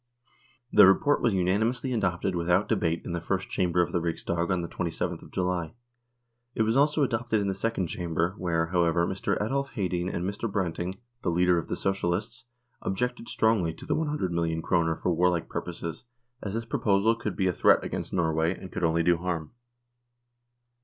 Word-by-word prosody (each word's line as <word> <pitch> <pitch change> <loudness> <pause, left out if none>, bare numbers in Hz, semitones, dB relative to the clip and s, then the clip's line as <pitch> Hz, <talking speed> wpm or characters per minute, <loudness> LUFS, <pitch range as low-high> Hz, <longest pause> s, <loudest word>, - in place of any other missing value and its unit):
The - - +9
report 145 +10 +4
was 115 -5 +2
unanimously 110 +8 +1
adopted 95 -4 0
without 90 +3 +2
debate 85 -6 0
in - - -4
the 85 -1 -2
First 95 +2 -2
Chamber 90 -1 +2
of - - -4
the 90 - 0
Riksdag 85 +1 -2
on 90 -1 0
the - - -3
27th 85 0 -3
of - - -13
July. 90 -1 -2 0.8
It 110 - +2
was 110 +1 +1
also 150 +2 +3
adopted 115 -3 0
in 100 - -1
the 95 - 0
Second 115 -2 -1
Chamber 85 +1 -1
where, 85 -2 +1
however, 85 0 +2
Mr. 95 +2 -1
Adolf 140 +6 -1
Hedin 90 -3 -1
and 85 - -3
Mr. 100 +2 -3
Branting, 90 -1 -2 0.2
the - - 0
leader 90 0 +3
of - - -6
the - - -2
Socialists, 100 +6 -2 0.4
objected 120 +4 -2
strongly 105 -8 +1
to - - -11
the - - 0
100,000,000 85 - -1
kroner 85 -2 +2
for 90 - -1
warlike 85 0 +1
pur - - -3
poses, 85 +3 -6 0.4
as 100 0 -4
this 115 0 -2
proposal 105 -1 +2
could 115 - -4
but - - -15
be 95 - +1
a 90 - +2
threat - - +4
against - - -4
Norway, 80 0 +1
and 95 - -9
could 95 - -4
only 85 0 +2
do 85 0 +4
harm. 85 -3 -3
90 Hz, 185 wpm, -27 LUFS, 85-110 Hz, 0.8 s, The